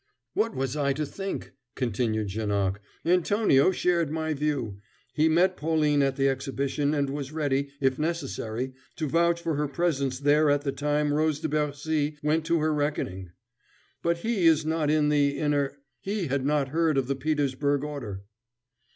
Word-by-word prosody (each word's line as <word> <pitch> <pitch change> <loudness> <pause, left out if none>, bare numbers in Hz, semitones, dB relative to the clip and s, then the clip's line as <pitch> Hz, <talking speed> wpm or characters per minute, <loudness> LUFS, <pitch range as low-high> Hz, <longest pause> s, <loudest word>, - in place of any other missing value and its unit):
"What 225 0 0
was 135 0 -2
I 140 -2 +1
to 150 +2 -2
think?" 195 +6 -5 0.2
continued 110 -3 -1
Janoc. 100 -1 -1 0.3
"Antonio 180 -3 +4
shared 175 -4 +1
my 160 0 -1
view. 140 -9 -2 0.3
He 155 +1 +3
met 180 +3 +3
Pauline 150 -3 +2
at 135 -1 +1
the 135 0 +2
Exhibition, 135 +2 -1
and 140 -1 +1
was 140 -1 -4
ready, 140 -3 0
if 135 0 +1
necessary, 130 -6 -3 0.2
to 155 - -2
vouch 170 +2 +2
for 165 - 0
her 150 0 0
presence 140 -3 0
there 145 +2 +3
at 145 0 +3
the 140 -1 -1
time 145 +2 0
Rose 155 0 +1
de 160 0 -2
Bercy 150 0 -1
went 160 +2 +1
to 170 - +3
her 155 0 +2
reckoning; 120 - -2 0.7
but 170 0 +1
he 195 -1 +1
is 160 -1 +4
not 160 -1 0
in 150 -1 +3
the 145 -1 +2
inner 145 -2 0 0.2
he 200 - -2
had 140 -1 -1
not 145 -2 +1
heard 160 0 +1
of 135 - +2
the 140 +2 -1
Petersburg 145 0 0
order." 120 -10 -5
145 Hz, 170 wpm, -27 LUFS, 135-160 Hz, 0.7 s, Antonio